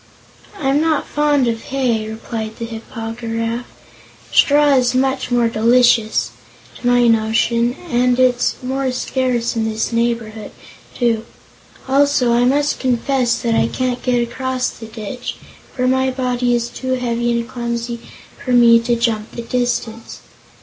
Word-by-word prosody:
"I'm 280 Hz, -2 st, +1 dB
not 315 Hz, -2 st, +1 dB
fond 290 Hz, -3 st, +1 dB
of 225 Hz, -1 st, -2 dB
hay," 240 Hz, -5 st, -1 dB
replied 220 Hz, 0 st, -5 dB
the 230 Hz, -, -4 dB
Hip 225 Hz, -1 st, -8 dB
po 225 Hz, -2 st, -5 dB
gy 230 Hz, 0 st, -8 dB
raf; 230 Hz, +2 st, -2 dB, 0.6 s
"straw 290 Hz, 0 st, +4 dB
is 250 Hz, -1 st, +2 dB
much 265 Hz, 0 st, 0 dB
more 240 Hz, -1 st, +2 dB
delicious, 225 Hz, -, +3 dB, 0.5 s
to 245 Hz, -, -3 dB
my 245 Hz, 0 st, +4 dB
notion, 230 Hz, +2 st, +2 dB
and 250 Hz, -3 st, +2 dB
it's 250 Hz, -1 st, +2 dB
more 265 Hz, +1 st, -1 dB
scarce 250 Hz, -2 st, -1 dB
in 220 Hz, -1 st, 0 dB
this 220 Hz, +2 st, -2 dB
neighborhood, 230 Hz, -2 st, -2 dB, 0.4 s
too. 230 Hz, -2 st, 0 dB, 0.6 s
Also 270 Hz, -3 st, +3 dB
I 240 Hz, +1 st, +3 dB
must 290 Hz, +3 st, +1 dB
confess 250 Hz, -1 st, +1 dB
that 230 Hz, -1 st, +1 dB
I -, -, +2 dB
can't 250 Hz, -1 st, -2 dB
get 245 Hz, -2 st, +1 dB
across 260 Hz, +1 st, -2 dB
the 225 Hz, -, -10 dB
ditch, 220 Hz, +3 st, -6 dB, 0.4 s
for 255 Hz, -1 st, 0 dB
my 260 Hz, +1 st, +2 dB
body 250 Hz, -2 st, 0 dB
is 235 Hz, 0 st, -1 dB
too 260 Hz, +1 st, -3 dB
heavy 240 Hz, -1 st, -1 dB
and 235 Hz, 0 st, -2 dB
clumsy 235 Hz, -1 st, -4 dB, 0.4 s
for 255 Hz, -, -1 dB
me 235 Hz, -1 st, +7 dB
to 235 Hz, +1 st, 0 dB
jump 230 Hz, -2 st, -1 dB
the 235 Hz, -, -6 dB
distance. 235 Hz, -2 st, -3 dB
240 Hz, 150 wpm, -18 LUFS, 230-255 Hz, 0.6 s, me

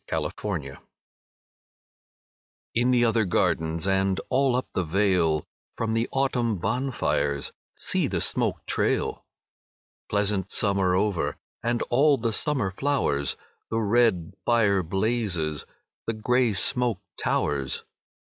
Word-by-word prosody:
VI -, -, -1 dB
Autumn -, -, -2 dB, 0.3 s
Fires 70 Hz, 0 st, -9 dB, 2.0 s
In 120 Hz, +2 st, +2 dB
the 120 Hz, -1 st, +4 dB
other 115 Hz, -1 st, +2 dB
gardens 80 Hz, -3 st, 0 dB
And 95 Hz, -1 st, +1 dB
all 130 Hz, -1 st, +2 dB
up 125 Hz, -, -1 dB
the 90 Hz, -, 0 dB
vale, 85 Hz, -3 st, +1 dB, 0.3 s
From 110 Hz, -1 st, -2 dB
the 115 Hz, +1 st, 0 dB
autumn 125 Hz, -5 st, 0 dB
bonfires 100 Hz, -, -1 dB, 0.3 s
See -, -, +2 dB
the -, -, -2 dB
smoke -, -, 0 dB
trail! -, -, 0 dB, 0.9 s
Pleasant 100 Hz, -2 st, +1 dB
summer 95 Hz, -3 st, +3 dB
over 90 Hz, -7 st, 0 dB, 0.2 s
And 120 Hz, +1 st, 0 dB
all 140 Hz, +3 st, +4 dB
the 115 Hz, -2 st, -1 dB
summer 130 Hz, -8 st, +1 dB
flowers, 90 Hz, -, 0 dB, 0.3 s
The 115 Hz, -, -1 dB
red 110 Hz, -6 st, +2 dB
fire 105 Hz, -4 st, +3 dB
blazes, 95 Hz, -4 st, -1 dB, 0.4 s
The 115 Hz, -, 0 dB
grey 125 Hz, +1 st, +1 dB
smoke 120 Hz, +1 st, +3 dB, 0.2 s
towers. 70 Hz, -2 st, -1 dB
105 Hz, 120 wpm, -25 LUFS, 90-120 Hz, 2.0 s, the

